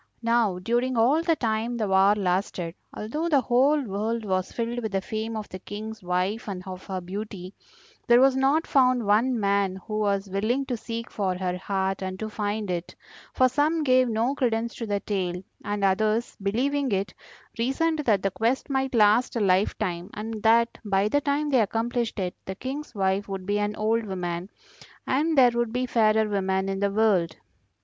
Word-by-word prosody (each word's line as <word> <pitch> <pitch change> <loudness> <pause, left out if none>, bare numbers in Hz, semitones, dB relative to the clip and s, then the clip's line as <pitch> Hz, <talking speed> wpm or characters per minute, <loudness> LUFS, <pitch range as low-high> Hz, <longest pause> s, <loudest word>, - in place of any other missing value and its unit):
Now 230 -5 +2
during 240 +6 0
all 260 +8 +4
the 335 -1 +2
time 230 -1 -1
the 215 -3 -1
war 195 +2 +4
lasted, 180 -3 -1 0.2
although 300 +11 -3
the 285 -4 +4
whole 260 +5 +3
world 220 +1 -2
was 185 -2 -1
filled 235 +1 -3
with 220 -3 -4
the 195 - +2
fame 220 +3 -4
of 215 - -5
the 185 - -7
King's 215 +3 -7
wife 185 +6 -1
and 185 -2 -5
of 185 0 -8
her 190 -1 -3
beauty, 190 0 -7 0.5
there 240 0 +6
was 265 0 +5
not 275 +5 +2
found 255 -4 +3
one 230 +4 +2
man 200 -2 +1
who 215 -1 -3
was 200 -1 0
willing 215 +8 0
to 255 - -2
seek 230 0 -6
for 190 -3 -1
her 180 -1 -2
heart 190 +1 -2
and 185 0 -4
to 215 +2 -5
find 205 -1 -2
it, 175 -1 -4 0.4
for 255 - +5
some 300 +5 +1
gave 255 -2 +4
no 230 +4 +1
credence 235 -4 -1
to 230 - -6
the 205 -1 -1
tale, 180 -4 -2 0.2
and 205 -1 -3
others, 215 +4 +1
believing 260 +7 0
it, 195 -1 -1 0.5
reasoned 310 +7 +1
that 220 -10 +2
the 195 - +1
quest 240 +8 -1
might 265 -1 0
last 215 +3 +4
a - - +1
life 195 -1 +2
time, 175 +1 -3
and 215 +1 -5
that 230 +1 +3
by 200 -1 +1
the 290 +7 +1
time 290 +1 0
they 255 -3 +4
accomplished 230 +2 -1
it 185 -3 -2
the 190 - -5
King's 270 +4 -6
wife 195 0 0
would 190 -1 -5
be 205 +1 0
an 205 0 -1
old 225 +2 +1
woman, 180 -1 -4 0.6
and 300 +4 +1
there 250 -2 +7
would 235 -1 -1
be 250 +2 -1
fairer 220 -3 +3
women 190 -1 0
in 195 0 -2
the 200 0 +1
world. 195 -6 +2
215 Hz, 190 wpm, -26 LUFS, 195-245 Hz, 0.6 s, there